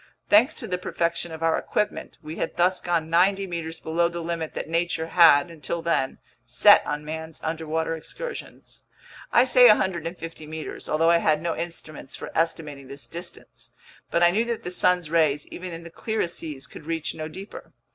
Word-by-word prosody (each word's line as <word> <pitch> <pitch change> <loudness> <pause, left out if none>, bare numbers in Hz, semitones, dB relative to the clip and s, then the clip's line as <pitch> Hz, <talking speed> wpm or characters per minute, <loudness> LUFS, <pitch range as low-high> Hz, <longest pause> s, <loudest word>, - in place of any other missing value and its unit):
Thanks 240 +9 +5
to - - -5
the 180 -1 -2
perfection 170 -1 -1
of 160 0 -6
our 165 -1 +2
equipment, 210 - -2
we 155 +2 -7
had - - -3
thus 180 +2 +3
gone 170 -2 0
ninety 195 +3 +3
meters 165 -3 -5
below 170 +2 +1
the 170 0 -5
limit 165 -1 -4
that - - -4
nature 165 0 0
had, 170 -2 +6
until 165 +1 -4
then, 150 -6 0 0.3
set 125 - +6
on 150 0 -3
man's 160 0 -6
underwater 160 0 -2
excursions. - - -8 0.5
I 240 - +6
say 250 -1 +7
150 170 -6 0
meters, 155 0 -6
although 165 +2 +3
I 170 - +6
had 155 -2 +2
no 165 +1 -2
instruments 160 -5 -7
for - - -8
estimating 150 -4 -2
this 140 +1 -8
distance. 170 +1 -10 0.4
But 170 - +2
I 175 - +6
knew 215 +5 +2
that 235 -1 -3
the 180 - -5
sun's 180 -3 +2
rays, 155 -3 +2
even 180 0 -7
in 165 0 -7
the 170 - -10
clearest 215 -3 -2
seas, 150 -5 -6
could 150 - -12
reach 165 -1 -2
no 155 0 -5
deeper. 190 +6 -10
165 Hz, 185 wpm, -25 LUFS, 160-175 Hz, 0.5 s, say